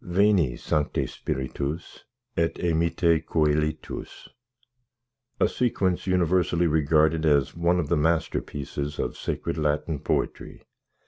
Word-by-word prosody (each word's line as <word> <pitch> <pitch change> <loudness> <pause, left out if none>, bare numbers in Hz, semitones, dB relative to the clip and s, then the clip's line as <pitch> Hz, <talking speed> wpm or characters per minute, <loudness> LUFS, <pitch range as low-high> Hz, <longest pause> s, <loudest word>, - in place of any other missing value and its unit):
VENI, 90 - +2
SANCTE 75 -1 -1
SPIRITUS 70 +5 -5 0.3
ET 85 0 0
EMITTE 85 -1 +1
CŒLITUS 75 -1 -1 1.1
A - - +4
sequence 95 -8 0
universally 90 -1 +2
regarded 80 0 +3
as 70 -3 +2
one 85 +1 +2
of 80 - -1
the 85 - +2
masterpieces 75 -2 -1
of - - -2
sacred 75 - -3
Latin 75 0 0
poetry. - - -3
80 Hz, 105 wpm, -26 LUFS, 75-85 Hz, 1.1 s, A